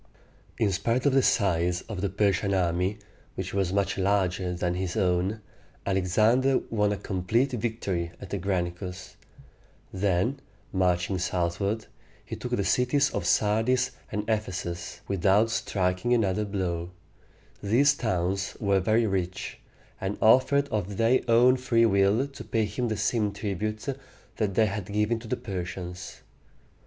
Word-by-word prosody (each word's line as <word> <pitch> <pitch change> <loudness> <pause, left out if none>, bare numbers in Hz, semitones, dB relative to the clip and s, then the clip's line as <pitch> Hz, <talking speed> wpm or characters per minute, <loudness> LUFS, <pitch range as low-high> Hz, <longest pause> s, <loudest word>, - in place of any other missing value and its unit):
In 105 -3 +2
spite 115 +7 0
of 140 - +4
the 135 - +5
size 90 -6 +2
of 105 -5 -6
the 100 - 0
Persian 100 0 +1
army, 90 +2 0 0.4
which - - -5
was 95 -2 0
much 100 0 0
larger 95 -2 +1
than 90 0 -1
his 90 -1 -3
own, 95 +4 +1 0.4
Alexander 110 +8 +3
won 105 -2 +2
a 105 - -1
complete 100 +8 0
victory 105 -8 -2
at 95 - -10
the 100 - -2
Granicus. 90 0 -3 0.8
Then, 100 +7 0 0.3
marching 90 0 +1
southward, 90 +5 -1 0.4
he - - -5
took - - -6
the - - 0
cities 140 +3 +2
of - - -2
Sardis 120 +5 +2 0.2
and 105 0 -3
Ephesus 90 -6 -3
without 100 +4 +3
striking 95 +3 0
another 105 -2 +1
blow. 90 -4 -2 0.7
These 130 +8 +4
towns 95 -5 -1
were 100 -2 +2
very 110 +4 +2
rich, 95 -3 -3 0.4
and 95 +2 -2
offered 135 +5 +4
of 100 -2 -3
their 115 +3 +3
own 120 +2 +5
free 120 -2 +3
will 100 +4 +3
to 140 -1 -10
pay 110 -2 0
him 115 +4 -2
the 110 -2 -2
same 105 -3 0
tribute 105 +1 -3 0.5
that 100 -4 -1
they 110 - +5
had 100 -1 -4
given 105 +2 +1
to 115 - -11
the - - -1
Persians. 90 -1 -6
100 Hz, 145 wpm, -27 LUFS, 90-115 Hz, 0.8 s, the